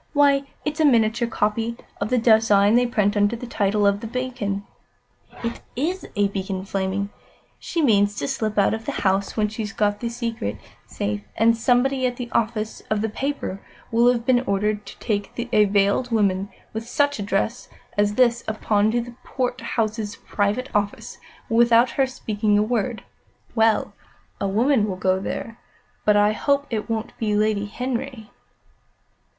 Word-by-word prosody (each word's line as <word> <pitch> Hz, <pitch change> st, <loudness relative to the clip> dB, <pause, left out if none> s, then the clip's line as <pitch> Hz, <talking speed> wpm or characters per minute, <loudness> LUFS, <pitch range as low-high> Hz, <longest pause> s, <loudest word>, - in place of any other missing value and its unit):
Why, 280 Hz, -1 st, +4 dB, 0.2 s
it's 300 Hz, +1 st, -2 dB
a 315 Hz, -, +4 dB
miniature 235 Hz, -3 st, +3 dB
copy 225 Hz, +1 st, -1 dB, 0.2 s
of 200 Hz, -, -1 dB
the 255 Hz, -, +2 dB
design 220 Hz, -3 st, +5 dB
they 245 Hz, +1 st, +4 dB
print 210 Hz, -4 st, +1 dB
under 205 Hz, +2 st, +2 dB
the 235 Hz, -, -7 dB
title 205 Hz, -3 st, +1 dB
of 200 Hz, 0 st, +3 dB
The 225 Hz, -, -6 dB
Beacon. 230 Hz, -5 st, -3 dB, 0.8 s
It 235 Hz, 0 st, -3 dB
is 340 Hz, +9 st, -2 dB
a 205 Hz, -1 st, +3 dB
beacon, 190 Hz, -1 st, -4 dB
flaming! 195 Hz, +1 st, -2 dB, 0.5 s
She 330 Hz, -, -2 dB
means 205 Hz, -5 st, +3 dB
to 140 Hz, -, -3 dB
slip 215 Hz, +5 st, -2 dB
out 200 Hz, -, +4 dB
of 225 Hz, 0 st, -4 dB
the -, -, -3 dB
house 195 Hz, +2 st, +1 dB
when 210 Hz, -1 st, +2 dB
she's 215 Hz, -1 st, -5 dB
got 205 Hz, 0 st, 0 dB
the 235 Hz, -, -2 dB
secret 230 Hz, -, -3 dB, 0.3 s
safe, 105 Hz, 0 st, -3 dB
and 230 Hz, +1 st, +4 dB
somebody 255 Hz, +3 st, +2 dB
at 245 Hz, -, -3 dB
the 240 Hz, -1 st, -6 dB
office 220 Hz, -1 st, -1 dB
of 215 Hz, -1 st, +1 dB
the 220 Hz, -, -1 dB
paper 265 Hz, -5 st, -3 dB, 0.3 s
will 235 Hz, +2 st, +5 dB
have 235 Hz, -1 st, -2 dB
been 250 Hz, -1 st, +4 dB
ordered 210 Hz, +1 st, 0 dB
to -, -, -10 dB
take 205 Hz, -2 st, -2 dB, 0.2 s
a 210 Hz, -, +6 dB
veiled 200 Hz, +5 st, +2 dB
woman 200 Hz, -4 st, +1 dB, 0.2 s
with 225 Hz, +2 st, -5 dB
such 285 Hz, -3 st, +1 dB
a -, -, -2 dB
dress 205 Hz, +4 st, -1 dB, 0.3 s
as 205 Hz, 0 st, +2 dB
this 235 Hz, -1 st, +3 dB
up 220 Hz, 0 st, -3 dB
to 225 Hz, +3 st, +1 dB
Portheous' 230 Hz, -4 st, -2 dB
private 210 Hz, +7 st, -1 dB
office, 205 Hz, -1 st, -2 dB, 0.3 s
without 235 Hz, +1 st, +4 dB
her 270 Hz, -1 st, +1 dB
speaking 215 Hz, -4 st, 0 dB
a 210 Hz, -, +4 dB
word. 235 Hz, +1 st, -1 dB, 0.5 s
Well 225 Hz, -1 st, +2 dB, 0.5 s
a 200 Hz, -, 0 dB
woman 220 Hz, +3 st, +2 dB
will 190 Hz, -, -2 dB
go 185 Hz, 0 st, +1 dB
there, 230 Hz, +3 st, -5 dB, 0.5 s
but 210 Hz, -1 st, +5 dB
I 205 Hz, 0 st, +4 dB
hope 280 Hz, +5 st, +1 dB
it 220 Hz, 0 st, -3 dB
won't 225 Hz, -1 st, -3 dB
be 210 Hz, -2 st, 0 dB
Lady 210 Hz, -1 st, +1 dB
Henry." 250 Hz, 0 st, -4 dB
220 Hz, 165 wpm, -23 LUFS, 205-240 Hz, 0.8 s, a